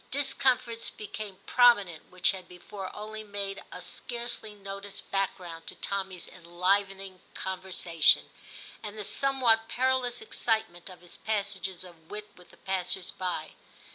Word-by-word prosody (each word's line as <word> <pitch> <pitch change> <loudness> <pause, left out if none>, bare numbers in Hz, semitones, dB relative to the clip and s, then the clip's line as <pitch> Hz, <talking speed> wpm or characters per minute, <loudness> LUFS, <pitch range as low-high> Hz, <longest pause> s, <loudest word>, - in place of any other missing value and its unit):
Discomforts 260 -4 +2
became 210 -2 -6
prominent 205 -10 +5
which 185 -1 +3
had 185 -2 -8
before 185 +2 -7
only 215 +1 -5
made 200 -1 -4
a 180 - -6
scarcely 235 +2 -3
noticed 200 0 -7
back 195 -1 +1
ground 165 -2 -8
to - - -5
Tommy's 190 -3 -3
enlivening 190 +2 0
conversation, 185 -4 +3 0.5
and 215 -1 -6
the 210 - -3
somewhat 240 -2 +3
perilous 255 -1 +2
excitement 220 -6 -1
of 180 -1 -12
his 175 - -9
passages 195 -4 -2
of 170 -3 -14
wit 210 0 -6
with 180 - -16
the - - -17
passers 190 -1 0
by. 180 -4 -2
195 Hz, 135 wpm, -30 LUFS, 185-220 Hz, 0.5 s, prominent